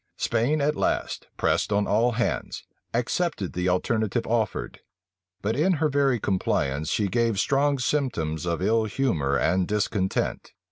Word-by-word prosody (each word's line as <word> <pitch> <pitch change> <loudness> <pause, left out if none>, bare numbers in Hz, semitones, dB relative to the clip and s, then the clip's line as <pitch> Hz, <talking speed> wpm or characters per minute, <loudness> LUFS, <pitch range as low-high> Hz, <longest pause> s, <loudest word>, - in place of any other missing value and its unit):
Spain 125 +7 +1
at 150 +2 +1
last, - - -1
pressed - - +1
on 105 0 +2
all 115 +4 +2
hands, 120 +1 -2 0.3
accepted 120 - -1
of - - -15
the 90 +1 0
alternative 110 +4 0
offered; 110 -3 -1 0.6
but 110 +3 0
in 170 +7 +3
her 155 -1 +1
very 135 -3 +2
compliance, 75 -7 0
she 105 - +1
gave 115 0 +1
strong 140 +4 +2
symptoms 115 - -1
of 85 -2 -1
ill 115 0 +2
humor 90 - 0
and 90 +5 +1
discontent. 105 -2 -1
110 Hz, 145 wpm, -25 LUFS, 95-135 Hz, 0.6 s, in